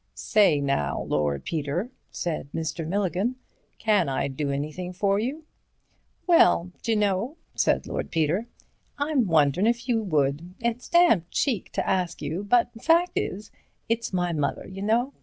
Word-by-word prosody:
"Say 195 -9 +3
now, 140 - -1
Lord 75 -2 -1
Peter," 165 - -2 0.2
said 165 -5 -3
Mr. 160 0 -3
Milligan, 195 +5 0 0.4
"can 205 -8 +2
I 135 +1 -1
do 140 +2 -3
anything 155 +6 -4
for 200 +1 +1
you?" 275 +8 -3 0.8
"Well, 255 - +4
d'you 230 - 0
know," 210 - 0 0.2
said - - +1
Lord - - -4
Peter, 165 +8 0 0.5
"I'm 285 -5 +1
wonderin' 160 +4 +3
if 235 +1 0
you 235 -3 +2
would. 155 -1 -1
It's 235 +1 -2
damned 340 - +4
cheek 240 -10 -1
to - - -1
ask 180 -2 0
you, 160 +7 -3
but 235 +3 +3
fact 340 +4 +4
is, 205 +3 -3 0.4
it's 230 0 -1
my 180 -2 0
mother, 150 -3 -2
you 190 +1 -8
know. 235 +6 +1
190 Hz, 150 wpm, -26 LUFS, 155-230 Hz, 0.8 s, Well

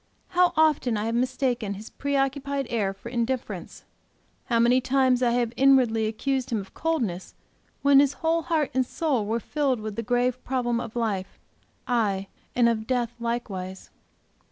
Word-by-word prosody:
How 360 -1 +4
often 300 -7 +3
I 210 - -2
have 230 - -1
mistaken 245 -4 0
his 210 +3 -10
preoccupied 280 0 -1
air 210 -5 0
for 195 +4 -10
indifference; 245 +1 -3 0.6
how 235 - +1
many 240 +2 +4
times 260 -1 +2
I 245 - +3
have 240 -1 0
inwardly 250 -5 +4
accused 260 +4 -2
him 230 - 0
of 195 -1 -9
coldness, 235 - -2 0.5
when 280 -1 +7
his 285 -1 +4
whole 330 +2 0
heart 310 -3 0
and 260 0 +2
soul 255 -5 -1
were 225 +2 0
filled 275 -1 -1
with 215 -1 -5
the - - 0
grave 245 +2 0
problem 240 -2 0
of 230 -1 -6
life, 210 -5 -2 0.5
aye, 205 -6 0 0.3
and 240 -1 +4
of 220 -2 0
death 245 -2 0
likewise. 200 -6 -4
245 Hz, 160 wpm, -26 LUFS, 225-270 Hz, 0.6 s, when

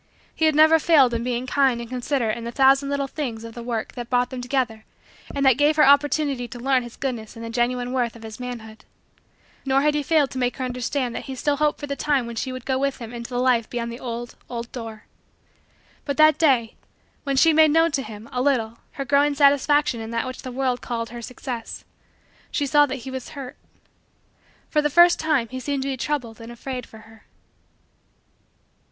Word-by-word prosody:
He 320 - +1
had 310 -1 +3
never 315 +1 +6
failed 290 -7 +4
in 230 0 -1
being 245 0 -2
kind 265 -2 +2
and 235 - -6
considerate 250 -2 -1
in 235 - -7
the 235 - -4
thousand 270 +2 +4
little 280 0 -1
things 255 -6 -5
of 230 0 -9
the 235 - -8
work 235 -2 -3
that 240 -1 -7
brought 245 0 +1
them 255 -1 -5
together 245 -4 -1 0.5
and 280 -1 0
that 265 0 +5
gave 295 +1 +4
her 300 - +5
opportunity 280 -2 +3
to 245 0 -9
learn 260 +1 +2
his 240 -1 -10
goodness 240 -5 -4
and 230 0 -7
the 230 - -6
genuine 245 +1 -1
worth 240 -3 -1
of 230 - -13
his 220 +1 -9
manhood. 225 -3 -8 0.8
Nor 270 0 +2
had 300 0 +3
he 295 - 0
failed 290 -1 +2
to 260 - -4
make 245 -1 -1
her 260 - -2
understand 250 0 -2
that - - -6
still 285 +2 0
he 305 - -1
hoped 300 - +1
for 290 - -5
the 280 -1 -4
time 280 -4 0
when 235 0 -7
she 260 +3 -3
would 255 -2 -7
go 260 -1 0
with 275 0 -1
him 230 -1 -8
into 235 0 -7
the 245 - -3
life 245 -2 +2
beyond 235 -1 -3
the 235 - -8
old, 240 -1 -5 0.2
old, 235 -1 -6
door. 225 -4 -8 1.0
But 280 -2 -3
that 310 -1 +5
day, 255 -8 +3 0.5
when 275 -1 -1
she 320 +4 +5
made 315 0 +6
known 325 +2 +3
to 280 - 0
him, 215 -2 -9
a 250 - -1
little, 235 -5 0
her 275 - -4
growing 285 +2 +3
satisfaction 285 -2 +3
in 220 - -6
that 230 +1 -2
which 255 0 -6
the 255 - -7
world 255 -1 -1
called 230 -2 -4
her 240 0 -7
success, 245 -1 -7 0.6
she 290 - -1
saw 290 +1 +4
that 260 -3 -6
he 265 - -6
was 260 -1 -6
hurt. 260 -2 -7 1.1
For 300 - +1
the 295 - +1
first 345 +4 +6
time 305 -7 +1
he 260 - -5
seemed 275 +1 -2
to 275 - -2
be 270 - -1
troubled 245 -4 -3
and 230 +1 -9
afraid 250 +1 -6
for 220 - -14
her. 225 -1 -18
255 Hz, 220 wpm, -23 LUFS, 235-280 Hz, 1.1 s, never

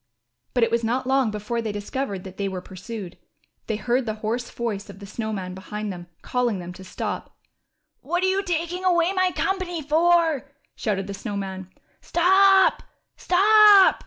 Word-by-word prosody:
But 245 - +3
it - - +2
was 235 0 +1
not 245 +3 0
long 265 -2 +2
before 215 +3 -3
they 220 -2 -3
discovered 205 -1 -4
that 190 -1 -10
they 200 - -1
were 190 -1 -4
pursued. 185 +1 -8 0.5
They 220 - -1
heard 245 +3 0
the 215 - -2
hoarse 240 +3 -2
voice 215 -4 -4
of 200 - -10
the 200 - -10
Snow 220 +2 -4
Man 185 -3 -4
behind 210 +2 -5
them 175 -1 -10 0.2
calling 245 -3 0
to - - -5
them 175 0 -8
to 190 - -12
stop. 185 - -5 0.7
^^What 350 +1 -1
are - - +4
you 380 +1 +2
taking 355 -1 -2
away 350 0 +3
my 370 -1 +2
company 365 -2 -2
for?" 320 -2 +2 0.2
shouted 195 -4 -2
the 200 - -6
Snow 205 +1 -5
Man. 190 -1 -5 0.3
Stop, 385 +2 +4 0.3
stop 410 +1 +6
235 Hz, 180 wpm, -24 LUFS, -, 0.7 s, stop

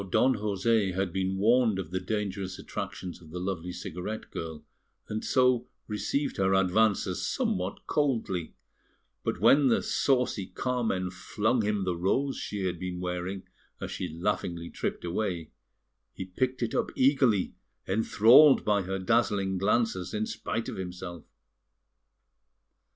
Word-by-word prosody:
Now 100 - -7
Don 130 +8 +3
José 100 -1 +1
had 95 -2 -1
been 95 0 -1
warned 115 +1 +3
of 90 -4 -5
the 95 - -1
dangerous 95 -1 -3
attractions 90 -1 -6
of 80 - -14
the 90 +3 -6
lovely 90 -1 -3
cigarette 90 +4 -6
girl, 80 -2 -6 0.4
and 110 +1 -3
so 125 -2 +3 0.2
received 140 +6 -2
her 95 0 +3
advances 95 -1 +2
somewhat 90 +1 -2
coldly; 115 - -1 0.7
but - - -2
when 140 -1 +6
the 120 - +3
saucy 125 -8 +1
Carmen 115 -8 -1
flung 110 +5 0
him 105 -1 0
the 90 -2 -1
rose 130 +11 0
she 100 -2 -4
had 90 -2 -2
been 90 -1 -4
wearing 90 +1 -3 0.4
as - - -5
she - - -3
laughingly 85 0 -2
tripped - - -3
away, 85 -2 -2 0.6
he 95 - -5
picked 125 +7 -1
it 115 - -2
up - - 0
eagerly, 130 -7 +3 0.3
enthralled 115 +7 +6
by 105 -1 +3
her 95 +1 -3
dazzling 95 -1 +1
glances 100 -2 0
in 110 +1 0
spite 115 +1 -3
of - - -5
himself. 90 -2 -6
95 Hz, 140 wpm, -29 LUFS, 90-115 Hz, 0.7 s, when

